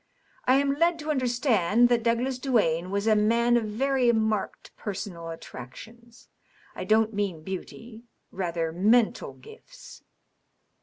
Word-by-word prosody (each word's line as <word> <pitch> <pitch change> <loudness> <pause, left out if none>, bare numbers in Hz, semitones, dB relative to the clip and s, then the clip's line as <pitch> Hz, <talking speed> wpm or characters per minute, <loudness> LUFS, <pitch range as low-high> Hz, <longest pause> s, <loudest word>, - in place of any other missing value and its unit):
"I 255 - +4
am 275 0 +2
led 340 0 +3
to 310 -1 -3
understand 240 - +2
that 240 -1 +2
Douglas 240 +3 0
Duane 185 - +1
was 200 +2 -2
a 220 -1 +4
man 235 +3 +3
of 235 -2 +1
very 250 +3 +1
marked 220 -3 -2
personal 185 -5 -6
attractions. 225 - -11 0.5
I - - -6
don't 220 0 +2
mean 195 -6 -3
beauty 220 +5 -8
— - - -48
rather, 170 -3 -2
mental 215 +7 +2
gifts." - - -15
225 Hz, 135 wpm, -26 LUFS, 200-245 Hz, 0.5 s, I